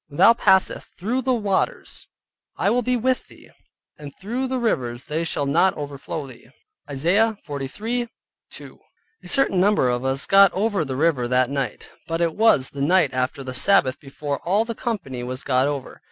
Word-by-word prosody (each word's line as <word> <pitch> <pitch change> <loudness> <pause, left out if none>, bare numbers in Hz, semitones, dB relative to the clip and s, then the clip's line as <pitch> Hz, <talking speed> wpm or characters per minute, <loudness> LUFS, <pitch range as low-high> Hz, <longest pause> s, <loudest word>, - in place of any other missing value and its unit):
"When 145 -1 -12
thou 195 +6 +7
passeth 190 -5 +2
through 235 +8 -1
the 255 0 +1
waters 210 - -2 0.5
I - - +1
will 250 - +2
be 250 +1 0
with 255 +2 -1
thee, - - -18 0.5
and 145 -1 -9
through 245 +7 -3
the 260 0 -2
rivers 125 - -1
they 160 +2 -2
shall 150 -3 -2
not 170 +7 +2
overflow 145 +1 -6
thee" 130 -3 -14 0.4
(Isaiah 190 +11 +1
43.2). 215 - -7 0.4
A - - -13
certain 270 -10 +2
number 200 -10 +3
of 125 0 -1
us 135 +1 0
got 195 -1 +6
over 200 -2 0
the 135 -3 -5
river 140 -4 +1
that 125 +1 +2
night, 135 -5 -4 0.2
but 165 0 -2
it 170 -2 +1
was 215 -12 +3
the 140 - -7
night 155 -2 +3
after 130 +2 -2
the 130 -1 -6
Sabbath 130 -3 +3
before 140 0 -5
all 200 +6 +1
the 230 - -4
company 180 - -4
was 130 +2 -5
got 130 0 +2
over. 145 -2 -5
165 Hz, 180 wpm, -22 LUFS, 135-215 Hz, 0.5 s, thou